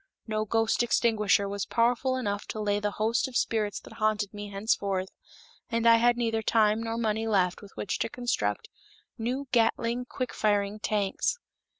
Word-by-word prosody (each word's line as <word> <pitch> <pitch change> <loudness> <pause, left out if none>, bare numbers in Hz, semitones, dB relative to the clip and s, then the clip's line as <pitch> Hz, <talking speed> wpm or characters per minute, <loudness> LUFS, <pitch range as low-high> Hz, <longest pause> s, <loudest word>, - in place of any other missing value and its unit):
No 215 -1 -1
ghost 225 +2 +1
extinguisher 215 -4 +2
was 200 0 -3
powerful 245 +3 +1
enough 205 -5 -3
to 215 - -5
lay 205 -1 +1
the 210 0 0
host 225 +5 +1
of 255 -1 -2
spirits 210 -2 0
that - - -13
haunted 215 -2 0
me 205 0 -7
henceforth, 195 -2 -1 0.6
and 230 0 -1
I 230 0 +8
had 240 +1 +3
neither 225 -2 0
time 220 -1 +3
nor 230 0 -3
money 225 -1 0
left 185 -3 +1
with 200 -2 -13
which 200 - -2
to - - -1
construct 245 - -2 0.5
new 250 +5 -2
Gatling 235 +1 +1
quick 250 0 -4
firing 205 -1 0
tanks. 210 - 0
220 Hz, 170 wpm, -28 LUFS, 205-235 Hz, 0.6 s, I